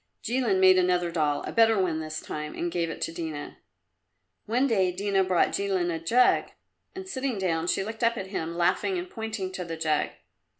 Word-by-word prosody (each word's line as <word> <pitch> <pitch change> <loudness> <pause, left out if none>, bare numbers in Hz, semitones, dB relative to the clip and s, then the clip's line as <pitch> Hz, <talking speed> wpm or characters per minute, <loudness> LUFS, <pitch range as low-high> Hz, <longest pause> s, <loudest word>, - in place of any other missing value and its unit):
Jilin 235 -5 +1
made 185 0 +6
another 180 -1 +1
doll 150 -3 0
a - - -5
better 225 -2 +4
one 170 -4 0
this 155 0 -5
time 150 0 -6
and 175 0 -2
gave 170 -1 -1
it - - -7
to - - -2
Dina. 160 -3 -6 0.9
One 245 +5 +2
day 195 -8 +2
Dina 195 +1 +1
brought 185 -2 +2
Jilin 190 -3 0
a 165 - -3
jug, 240 +10 +3 0.5
and 380 0 -7
sitting 265 - -2
down, 170 -3 -1
she 195 - +1
looked 220 +3 -6
up 230 0 +3
at 195 - -4
him, 165 0 -3
laughing 180 - +1
and 355 +1 -4
pointing 220 - -4
to 185 -1 -5
the 165 -1 -6
jug. 155 -2 +1
185 Hz, 200 wpm, -27 LUFS, 165-220 Hz, 0.9 s, made